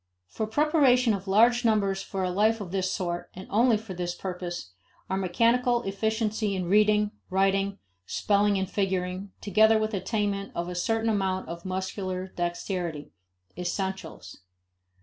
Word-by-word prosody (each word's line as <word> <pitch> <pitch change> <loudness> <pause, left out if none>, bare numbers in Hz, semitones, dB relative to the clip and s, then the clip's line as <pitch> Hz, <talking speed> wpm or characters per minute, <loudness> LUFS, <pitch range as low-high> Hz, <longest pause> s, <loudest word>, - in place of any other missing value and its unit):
For 215 - -3
preparation 260 -2 +3
of 195 -1 -4
large 235 +5 +4
numbers 200 -4 +2
for 195 -1 -4
a 180 - 0
life 215 +4 +2
of 190 -4 -6
this 190 -1 0
sort, 175 -3 -3
and 185 - -8
only 230 +2 +4
for 215 -2 -8
this 175 0 -3
purpose, 175 - -5 0.4
are - - +1
mechanical 235 +6 +2
efficiency 215 +1 -1
in 185 -1 -2
reading, 210 +2 +3 0.2
writing, 195 +1 +1 0.3
spelling 205 0 +2
and 190 0 -1
figuring, 190 0 -2
together 220 +2 +4
with 215 0 -1
attainment 200 0 -2
of 170 0 -2
a - - -4
certain 225 +5 0
amount 190 -2 -1
of 170 +1 -7
muscular 185 0 -3
dexterity, 175 -3 -3 0.4
"essentials." 190 +2 -4
195 Hz, 145 wpm, -27 LUFS, 185-215 Hz, 0.4 s, large